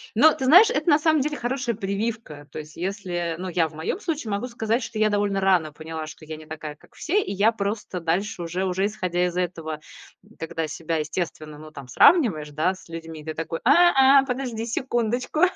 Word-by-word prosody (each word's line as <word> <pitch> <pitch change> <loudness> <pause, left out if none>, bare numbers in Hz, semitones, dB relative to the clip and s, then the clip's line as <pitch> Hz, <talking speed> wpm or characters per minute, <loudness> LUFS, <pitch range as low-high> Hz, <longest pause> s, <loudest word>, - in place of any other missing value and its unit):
но 310 +8 +6
ты 265 - -4
знаешь, 365 +11 +8
это 425 - 0
на 290 - +6
самом 315 -1 +3
деле 295 +2 -2
хорошая 245 -1 -2
прививка. 200 -6 -4
То - - -6
есть, 150 0 -10
если, 175 -3 -3
ну, 185 - -4
я 170 -2 +1
в 155 - -16
моем 160 - -3
случае 305 - -3
могу 200 +5 -2
сказать, 230 0 -1
что 225 - -6
я 215 0 +4
довольно 205 -1 +1
рано 180 -5 +2
поняла, 160 0 -6
что 155 - -11
я 155 0 -6
не 155 - -12
такая, 155 -1 -7
как - - -23
все. 390 +6 0
И - - -5
я 205 +3 +3
просто 205 -3 -3
дальше 175 +4 -1
уже 175 +3 -2
уже 190 +2 0
исходя 180 -4 -1
из 175 0 -5
этого, 165 -4 -3 0.6
когда 165 0 -3
себя, 165 +1 -3
естественно, 155 -1 -4
ну, 155 0 -11
там 140 -4 -10
сравниваешь, 160 - +4
да, 155 +6 +1
с 185 - -17
людьми, 165 -2 -8
ты 155 0 -5
такой: 165 0 -4
"А, 275 -2 +6
а, - - -6
подожди 250 -3 -3
секундочку, 240 +3 -1
190 Hz, 210 wpm, -24 LUFS, 160-240 Hz, 0.6 s, знаешь